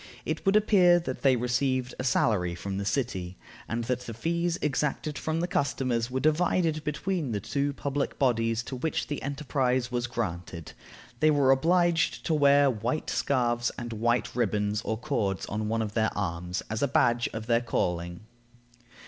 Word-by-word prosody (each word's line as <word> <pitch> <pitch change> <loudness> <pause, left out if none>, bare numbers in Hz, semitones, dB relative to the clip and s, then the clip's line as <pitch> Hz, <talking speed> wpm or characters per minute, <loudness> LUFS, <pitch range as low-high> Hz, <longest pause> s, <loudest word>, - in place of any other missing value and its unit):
It - - -3
would 195 - +4
appear 185 -5 +5
that 130 -6 -5
they 135 -2 +4
received 125 +1 0
a - - -2
salary 100 -8 +1
from 95 +2 -4
the 100 - -3
city, 95 -7 -2 0.3
and 115 +1 -2
that 125 +1 -1
the 120 -3 -8
fees 170 +6 -1
exacted 150 +1 -1
from 160 +2 -2
the 175 - 0
customers 130 -9 0
were 130 +1 -2
divided 155 +1 +1
between 150 -2 -2
the 105 - -1
two 140 +7 -1
public 140 0 -3
bodies 115 -3 +1
to 130 - -6
which 145 +5 -2
the 145 - -4
enterprise 130 -3 -1
was 120 -1 -1
granted. 90 -8 -5 0.5
They 155 - +4
were 140 -3 +4
obliged 170 +4 +2
to 165 - +1
wear 145 -1 +5
white 125 +4 -1
scarfs 120 -3 +1
and 120 -1 -5
white 120 +1 0
ribbons 105 -2 0
or 110 - -2
cords 110 -8 -1
on 105 +1 -3
one 115 +1 0
of 105 -1 -5
their 110 -1 +2
arms, 90 -2 -3
as 110 +1 -3
a 140 - +3
badge 120 -2 +2
of 110 -1 -5
their 115 0 +2
calling. 85 -6 -2
125 Hz, 175 wpm, -28 LUFS, 110-145 Hz, 0.5 s, appear